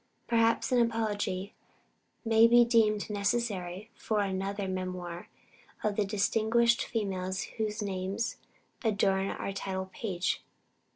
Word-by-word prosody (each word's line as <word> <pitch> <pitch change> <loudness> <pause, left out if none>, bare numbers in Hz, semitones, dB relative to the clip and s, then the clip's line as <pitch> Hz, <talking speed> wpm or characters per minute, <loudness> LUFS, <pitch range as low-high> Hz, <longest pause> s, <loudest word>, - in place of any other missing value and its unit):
Perhaps 230 +1 +2
an 250 - +4
apology 210 -4 -1 0.7
may 225 0 +6
be 240 +1 +6
deemed 220 -3 +3
necessary 205 -3 -2
for 215 -2 -1
another 195 0 -2
memoir 185 -2 -4 0.6
of 210 -1 0
the 210 - +1
distinguished 225 +3 +2
females 190 -4 -2 0.2
whose 215 -1 -1
names 195 +3 -2 0.5
adorn 195 -3 +2
our 195 - -4
title 190 -1 -4
page. 185 -4 -2
205 Hz, 110 wpm, -30 LUFS, 190-225 Hz, 0.7 s, may